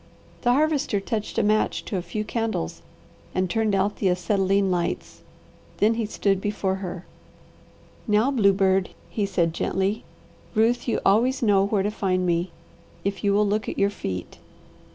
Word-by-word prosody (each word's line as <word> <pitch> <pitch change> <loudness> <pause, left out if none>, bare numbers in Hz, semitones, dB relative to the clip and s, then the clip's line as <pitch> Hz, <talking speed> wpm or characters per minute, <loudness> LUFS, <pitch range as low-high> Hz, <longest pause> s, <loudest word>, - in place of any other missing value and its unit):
The 245 -1 +3
Harvester 290 -6 +1
touched 215 +2 -4
a - - +3
match 215 +1 +1
to - - -4
a 185 - 0
few 180 +5 -4
candles 220 - -2 0.5
and 185 0 +1
turned 215 +2 +1
out 195 +2 0
the 195 - +1
acetylene 195 +2 +1
lights. 175 0 -2 0.6
Then 215 +2 +3
he 225 -1 -2
stood 195 -2 0
before 195 -2 -1
her. 185 -2 -6 1.0
"Now, 215 +5 +3
bluebird," 195 -5 +3 0.2
he 205 -2 -1
said 170 -4 +1
gently. 195 +5 -1 0.5
"Ruth, 230 +4 +2
you 235 - 0
always 240 +7 +3
know 200 -3 +4
where 200 -2 +1
to 205 - 0
find 185 -3 0
me, 175 +1 +1 0.5
if 200 +2 -3
you 200 - +3
will 210 +1 +3
look 205 +1 0
at - - -5
your 200 0 +2
feet. 90 - -6
200 Hz, 160 wpm, -24 LUFS, 190-215 Hz, 1.0 s, know